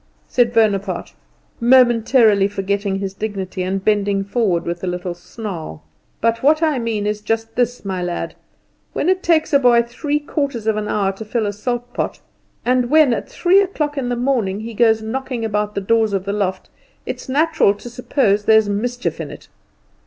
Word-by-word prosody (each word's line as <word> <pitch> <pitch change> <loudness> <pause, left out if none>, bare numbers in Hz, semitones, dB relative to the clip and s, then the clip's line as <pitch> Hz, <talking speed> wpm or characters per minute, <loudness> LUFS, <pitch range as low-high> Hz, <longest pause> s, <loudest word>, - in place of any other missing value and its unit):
said 240 -2 +2
Bonaparte, 200 -5 0 0.5
momentarily 235 -4 +4
forgetting 200 0 -2
his 195 -1 -4
dignity, 195 -3 -4
and 190 +1 -2
bending 205 -2 +1
forward 195 -5 0
with 170 +1 -4
a - - -2
little 180 0 -3
snarl. 175 - -8 0.4
"But 230 0 +1
what 310 +4 +3
I 305 -5 +2
mean 225 -3 -2
is 210 0 -2
just 225 +1 -2
this, 245 -2 -1
my 190 -2 -3
lad 175 -1 -3 0.6
when 330 - 0
it 375 0 +2
takes 330 -2 +2
a 280 - +6
boy 240 -3 +5
three 290 +5 -2
quarters 280 -6 -3
of 220 -1 +2
an 210 0 -3
hour 200 -2 0
to 195 +3 -8
fill 220 +1 -1
a 205 - -2
salt 245 +3 -4
pot, - - -3 0.5
and 250 -1 +2
when 305 -4 +5
at - - -4
three 370 +3 +4
o'clock 305 -7 -2
in 265 -3 -2
the 245 - 0
morning 235 -6 0
he 230 +1 -7
goes 220 -1 +3
knocking 245 0 -3
about 210 -1 -1
the 200 - -1
doors 220 +1 +2
of 195 0 -2
a 200 - -1
loft, 190 -3 -2 0.3
it's - - -6
natural 290 -7 +3
to 205 - -11
suppose 240 -4 0
there's 220 -1 +5
mischief 240 +5 -2
in - - -6
it. - - -12
220 Hz, 185 wpm, -19 LUFS, 200-245 Hz, 0.6 s, a